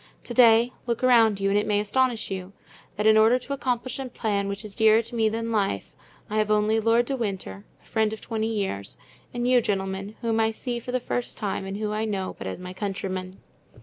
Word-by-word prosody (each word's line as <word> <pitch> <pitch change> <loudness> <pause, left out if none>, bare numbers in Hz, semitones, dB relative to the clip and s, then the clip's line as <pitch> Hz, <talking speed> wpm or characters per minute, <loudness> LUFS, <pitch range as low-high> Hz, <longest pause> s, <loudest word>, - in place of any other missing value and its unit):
To 240 - -6
day, 235 0 +6
look 235 +1 -1
around 225 -5 +5
you, 195 0 +1
and 205 - +3
it 210 - -2
may 205 -1 +2
astonish 230 +1 0
you, 190 0 -5 0.4
that 210 - -2
in 220 0 +6
order 225 +3 +5
to 255 +2 -5
accomplish 255 -1 -2
a 265 - -4
plan 205 -4 -1
which 200 +2 -4
is 205 -2 -8
dearer 220 0 +5
to 230 +2 -11
me 225 -2 +2
than 230 +1 -3
life 195 - -1 0.3
I 215 +1 -1
have 215 0 +1
only 215 +1 +3
Lord 230 +2 +3
de 275 - -2
Winter, 190 - -4 0.2
the - - -28
friend 220 -1 +1
of 220 - -6
twenty 225 0 -2
years, 190 - -3 0.3
and 240 0 -2
you, 250 -1 +5
gentlemen, 195 0 -3
whom 225 -1 0
I 220 0 +3
see 240 +2 -4
for 250 - -7
the 255 - +1
first 245 0 -4
time 195 -2 -3
and 195 +1 -4
whom 210 0 -2
I 215 +1 -1
know 195 -3 -3
but 95 - -5
as 95 - -5
my 180 0 -7
countrymen." 190 -1 -4
220 Hz, 230 wpm, -25 LUFS, 200-235 Hz, 0.4 s, day